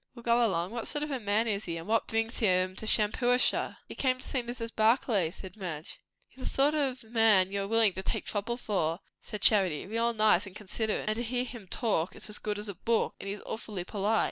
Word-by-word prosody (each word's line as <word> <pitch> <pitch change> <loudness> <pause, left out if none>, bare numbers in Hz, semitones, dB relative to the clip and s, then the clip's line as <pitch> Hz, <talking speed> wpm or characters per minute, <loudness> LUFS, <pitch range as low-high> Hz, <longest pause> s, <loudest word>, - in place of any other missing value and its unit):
"Well, 235 - -11
go 235 +1 +3
along. 185 -4 0
What 235 -1 -4
sort 295 - -1
of 300 - -4
a 265 - -1
man 210 +1 +1
is 205 -1 -1
he? 170 -1 -3
and 165 - -7
what 225 +1 +1
brings 225 +1 -1
him 185 -3 +2
to 220 - -4
Shampuashuh?" 245 +4 +2
"He - - -8
came 255 -2 +1
to 255 - -9
see 260 - 0
Mrs. 235 -1 -6
Barclay," 220 -5 +3
said 185 +1 -10
Madge. 170 -7 -6 0.3
"He's 260 - -16
a - - -2
sort 280 +2 +2
of 270 -5 -1
man 220 -4 +4
you 200 0 -1
are 195 - -3
willin' 225 -2 +4
to 190 - -5
take - - -3
trouble 225 +3 -2
for," 185 -8 -1 0.2
said 210 - -7
Charity. 190 -8 +4
"Real 230 +4 0
nice, 215 -4 +3
and 190 - -12
considerate; 210 +1 -2
and 215 +1 0
to - - -1
hear 245 +1 -1
him 240 -5 -9
talk, 185 -4 0
it - - -10
is - - -4
as 210 - -3
good 210 -1 -3
as 210 +1 -5
a 200 - -4
book; 225 +5 0
and 200 - -6
he's 205 +1 -5
awfully 215 -5 -4
polite. 210 +3 0
215 Hz, 245 wpm, -30 LUFS, 195-235 Hz, 0.3 s, man